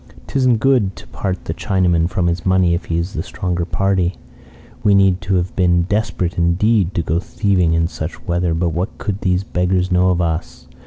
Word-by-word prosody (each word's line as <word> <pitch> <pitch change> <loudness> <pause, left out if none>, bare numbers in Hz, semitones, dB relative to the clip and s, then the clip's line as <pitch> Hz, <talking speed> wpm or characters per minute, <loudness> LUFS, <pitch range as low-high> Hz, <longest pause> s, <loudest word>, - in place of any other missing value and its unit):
'Tisn't 130 -4 +2
good 115 -6 +2
to - - -12
part 95 -1 -4
the - - -3
Chinaman 90 -3 +1
from 90 -1 -1
his 85 0 -1
money 95 -2 +3
if 85 +1 -2
he 85 - -2
is 85 +4 -3
the 80 - -2
stronger 90 -1 -3
party. 95 -1 0 0.7
We 105 -2 +4
need 95 0 +3
have 90 -2 0
been 90 -2 +3
desperate 95 -3 -1
indeed 95 +3 +2
to 85 - 0
go 80 +2 0
thieving 90 -3 +1
in 80 0 +2
such 80 0 -7
weather, 85 -1 0
but 85 +1 0
what 85 +6 -3
could 100 -2 -4
these 90 0 +1
beggars 90 0 0
know 90 +1 +3
of 90 -1 +1
us? 85 -1 -3
90 Hz, 195 wpm, -18 LUFS, 85-95 Hz, 0.7 s, We